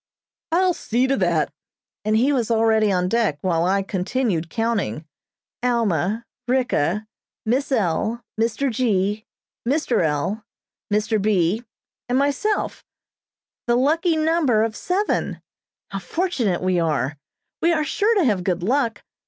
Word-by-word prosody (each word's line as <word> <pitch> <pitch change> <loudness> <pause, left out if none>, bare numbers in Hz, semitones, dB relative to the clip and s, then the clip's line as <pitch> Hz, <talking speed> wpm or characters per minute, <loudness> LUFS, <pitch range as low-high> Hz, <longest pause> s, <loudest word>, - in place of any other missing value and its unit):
"I'll 365 +2 +3
see 250 -6 0
to 270 +1 +2
that," 170 -6 +1 0.5
and 215 +1 +2
he 265 +6 +3
was 240 -5 0
already 220 -2 +3
on 180 -1 +1
deck, 225 -7 +1
while 170 -2 +1
I 195 +2 +2
continued 190 -2 -1
counting. 205 - -1 0.6
"Alma, 225 -3 0 0.2
Ricka, 220 - +1 0.4
Miss 265 +6 0
L., 220 +1 0
Mr. 230 +4 0
G., 210 -3 0 0.4
Mr. 255 - +1
L., 160 +8 -1 0.5
Mr. 215 +1 +1
B., 200 +1 +2 0.5
and 250 - +2
myself 285 +10 0 0.8
the 240 - +3
lucky 320 +6 +2
number 310 -8 +2
of 225 -1 -2
seven. 385 - -1 0.5
How 195 - -3
fortunate 230 - -1
we 185 -1 +2
are. 150 -3 0 0.4
We 340 - +4
are 310 -2 +2
sure 420 +10 +1
to 380 -6 +3
have 205 -7 +1
good 180 -2 -1
luck. 235 +2 0
225 Hz, 130 wpm, -22 LUFS, 185-265 Hz, 0.8 s, We